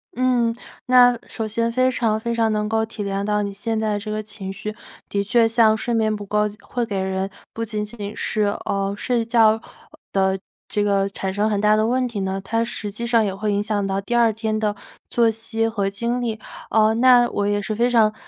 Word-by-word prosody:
嗯， 245 -2 +2 0.3
那 245 -1 +6
首 220 - -4
先 230 +2 -1
非 255 +1 +2
常 225 -4 0
非 235 +1 -2
常 225 -1 +1
能 210 0 0
够 220 0 +1
体 220 -1 -6
谅 200 0 -2
到 210 0 +1
你 200 -1 -4
现 220 +2 -2
在 215 -1 0
这 215 +1 -7
个 215 0 -2
情 205 -2 -7
绪， 210 +2 -6 0.3
的 200 0 0
确 230 +3 +3
像 225 -1 +4
睡 240 - -2
眠 220 -1 +2
不 205 -1 -7
够， 210 +1 +1 0.2
会 240 -2 -3
给 200 -4 -3
人 190 0 -2 0.2
不 230 - -3
仅 210 -1 -3
仅 210 -1 -7
是， 215 - -1 0.2
呃， 195 0 -1
睡 235 +1 0
觉 225 -1 +4 0.5
的 190 0 +2 0.3
这 205 - 0
个 200 -1 +2
产 190 -1 -4
生 210 +2 +1
很 205 - 0
大 210 0 +4
的 215 0 +2
问 255 +1 +1
题 225 -4 -4
呢， 190 0 -2
它 225 +4 0
实 220 -3 -5
际 235 +4 -5
上 235 -1 +3
也 195 -2 -1
会 210 +1 -1
影 200 - +1
响 205 -2 -1
到 195 0 -1
第 240 +5 -3
2 235 -1 +5
天 220 0 -2
的 210 -1 0 0.3
作 235 -1 +3
息 225 0 -2
和 205 -3 -1
精 235 +5 -2
力。 225 -3 -2 0.3
呃， 220 0 +4
那 245 0 +5
我 205 0 -1
也 205 0 +1
是 215 +1 -3
非 240 +2 +2
常 220 -3 +4
215 Hz, 235 characters per minute, -22 LUFS, 205-230 Hz, 0.5 s, 那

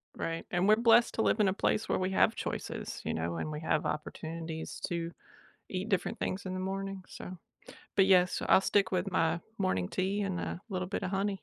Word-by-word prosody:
Right, 165 0 -3
and 180 +2 +2
we're 215 - +7
blessed 235 +1 +5
to 220 - +1
live 215 - +2
in 210 - +5
a 190 - +2
place 215 - 0
where - - +2
we 185 +1 -1
have - - +4
choices, - - -4
you - - -2
know, 85 +1 -2
and 155 - -3
we 150 - -4
have 155 -1 +1
opportunities 160 +1 -5
to 170 -2 -3 0.6
eat 190 +3 -3
different 195 -4 0
things 190 +1 -2
in 185 - -3
the 185 - -3
morning. 195 0 -3
So. 180 0 -8 0.6
But 195 -1 +5
yes, 180 -2 +5
so - - -2
I'll - - +7
stick 195 -1 +2
with 190 +1 0
my 165 -1 +1 0.2
morning 95 - 0
tea 195 +2 -1
and 190 -3 -2
a 175 - -4
little 185 -2 -3
bit 200 -1 -3
of 185 - -2
honey. 195 0 -1
185 Hz, 220 wpm, -31 LUFS, 170-195 Hz, 0.6 s, we're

